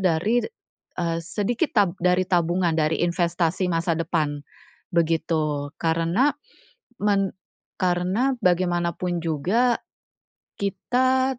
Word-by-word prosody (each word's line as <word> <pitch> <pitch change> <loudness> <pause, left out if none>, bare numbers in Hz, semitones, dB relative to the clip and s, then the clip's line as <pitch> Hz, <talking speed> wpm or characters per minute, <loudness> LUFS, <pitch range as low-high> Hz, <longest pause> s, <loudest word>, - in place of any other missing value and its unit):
dari, 190 +6 +2 0.6
eee, 165 -1 -1
sedikit 220 - -1
tab 205 -4 +4
dari 180 +1 +3
tabungan, 175 -1 +1
dari 155 +1 +1
investasi 175 +1 0
masa 170 0 0
depan, 155 -3 -1 0.5
begitu 155 -3 0
karena 170 - +2 0.7
men 200 -2 +2 0.5
karena 185 +9 +1
bagaimanapun 175 -1 +1
juga, 195 - +1 0.8
kita 255 +6 +1
175 Hz, 90 wpm, -24 LUFS, 165-200 Hz, 0.8 s, tab